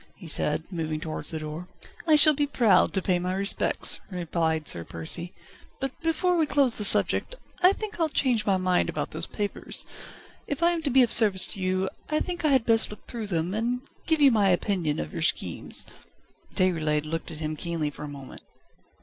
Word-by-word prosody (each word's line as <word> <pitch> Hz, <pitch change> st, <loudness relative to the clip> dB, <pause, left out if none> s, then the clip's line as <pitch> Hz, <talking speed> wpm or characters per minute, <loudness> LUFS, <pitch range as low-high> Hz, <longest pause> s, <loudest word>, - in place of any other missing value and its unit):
he 175 Hz, -, -12 dB
said, 150 Hz, 0 st, +3 dB
moving 160 Hz, -3 st, -3 dB
towards 155 Hz, -2 st, -4 dB
the 160 Hz, -, -3 dB
door. 155 Hz, +3 st, -7 dB, 0.4 s
"I 310 Hz, -, +6 dB
shall 305 Hz, +1 st, +8 dB
be 290 Hz, 0 st, 0 dB
proud 235 Hz, -7 st, +3 dB
to 190 Hz, -, -1 dB
pay 180 Hz, -3 st, +1 dB
my 180 Hz, +1 st, -2 dB
respects," 200 Hz, +1 st, +1 dB
replied 165 Hz, -4 st, -2 dB
Sir 85 Hz, -, -2 dB
Percy; 125 Hz, -, -2 dB, 0.5 s
"but 270 Hz, -1 st, -2 dB
before 335 Hz, +2 st, +1 dB
we 320 Hz, -3 st, +2 dB
close 275 Hz, -4 st, +2 dB
the 210 Hz, -, -4 dB
subject, -, -, +3 dB, 0.3 s
I 365 Hz, +1 st, +7 dB
think 420 Hz, -1 st, -6 dB
I'll 325 Hz, -1 st, +1 dB
change 250 Hz, -6 st, +1 dB
my 195 Hz, -2 st, +1 dB
mind 185 Hz, -1 st, +1 dB
about -, -, -4 dB
those -, -, -4 dB
papers. 205 Hz, -1 st, -1 dB, 0.6 s
If 285 Hz, +3 st, -3 dB
I 340 Hz, -, +5 dB
am 340 Hz, -1 st, -2 dB
to 305 Hz, -, -2 dB
be 265 Hz, 0 st, +5 dB
of 235 Hz, -, 0 dB
service 205 Hz, -5 st, +5 dB
to 200 Hz, -, -7 dB
you 185 Hz, +1 st, 0 dB, 0.2 s
I 305 Hz, 0 st, +1 dB
think 350 Hz, -1 st, -4 dB
I -, -, +3 dB
had 265 Hz, -5 st, +3 dB
best 225 Hz, -1 st, +3 dB
look 210 Hz, -, -12 dB
through 230 Hz, -3 st, -6 dB
them, 175 Hz, -1 st, -2 dB
and 240 Hz, +4 st, -2 dB, 0.2 s
give 320 Hz, -1 st, +2 dB
you 280 Hz, -2 st, +6 dB
my 205 Hz, -4 st, +3 dB
opinion 175 Hz, -4 st, 0 dB
of 75 Hz, 0 st, -5 dB
your -, -, -4 dB
schemes." -, -, -1 dB, 0.7 s
Déroulède 155 Hz, -5 st, +1 dB
looked 165 Hz, +1 st, -4 dB
at 155 Hz, -, -7 dB
him 155 Hz, 0 st, -4 dB
keenly 160 Hz, -2 st, -3 dB
for 145 Hz, -, -10 dB
a -, -, -5 dB
moment. 140 Hz, -2 st, -10 dB
195 Hz, 205 wpm, -26 LUFS, 160-270 Hz, 0.7 s, shall